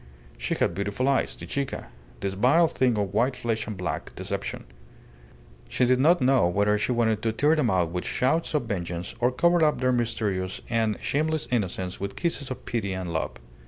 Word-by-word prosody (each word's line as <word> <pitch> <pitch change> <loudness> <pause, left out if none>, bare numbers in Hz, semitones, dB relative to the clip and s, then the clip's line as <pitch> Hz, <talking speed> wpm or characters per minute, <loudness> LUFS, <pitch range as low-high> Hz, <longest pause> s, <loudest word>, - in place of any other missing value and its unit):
She - - -2
had - - +1
beautiful 100 +7 -1
eyes 140 -1 +1
the - - -8
Chica 140 -1 -3 0.3
this 100 -1 -1
vile 135 - +4
thing 125 -6 +1
of 100 -2 -1
white 125 +5 +2
flesh 115 -2 -2
and 105 -3 -5
black 85 -5 -4
deception. - - -4 1.1
She 125 - +2
did 125 +1 +3
not 160 +4 +4
know 130 -7 +4
whether 100 +4 +2
she 115 - 0
wanted 110 -3 +1
to 115 - +1
tear 145 +8 +3
them 145 -7 +2
out 90 -3 +1
with 90 0 -3
shouts 155 +5 0
of 150 - +2
vengeance 90 -5 -4
or 125 +1 +3
cover 170 +5 +3
up 150 -1 +3
their 130 0 +2
mysterious 110 -6 -1
and 110 -2 +1
shameless 155 +1 0
innocence 95 -5 -1
with 100 0 -4
kisses 165 -5 -2
of 130 - -7
pity 105 -5 -2
and 90 -2 -4
love. 80 - -2
115 Hz, 195 wpm, -26 LUFS, 95-130 Hz, 1.1 s, vile